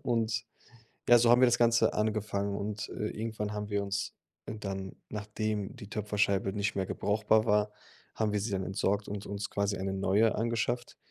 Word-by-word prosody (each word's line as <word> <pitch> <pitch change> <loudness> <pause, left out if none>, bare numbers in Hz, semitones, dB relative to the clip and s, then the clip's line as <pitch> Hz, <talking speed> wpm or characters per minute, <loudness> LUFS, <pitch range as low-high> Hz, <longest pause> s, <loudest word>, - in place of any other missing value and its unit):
und 115 -3 0 0.7
ja, 120 - +9
so 115 0 +5
haben 120 - +6
wir 130 - +8
das 120 0 +3
Ganze 115 -1 +4
angefangen 105 -2 -1
und, 105 +1 -4
äh, 105 - -3
irgendwann 110 -1 -4
haben 105 0 -4
wir 100 -1 0
uns 100 0 -2 0.3
dann, 95 -3 -5
nachdem 105 -1 -3
die 100 - -10
Töpferscheibe 100 -2 0
nicht 105 +1 -1
mehr 95 -1 0
brauchbar 110 +3 +2
war 105 -1 +2 0.4
haben 110 -2 +1
wir 105 - +2
sie 105 +2 -3
dann 95 -1 -1
entsorgt 100 +2 0
und 100 0 -5
uns 100 +1 -4
quasi 100 0 0
eine 95 +1 -2
neue 100 +3 +3
angeschafft, 115 +2 -1
105 Hz, 180 wpm, -31 LUFS, 100-110 Hz, 0.7 s, ja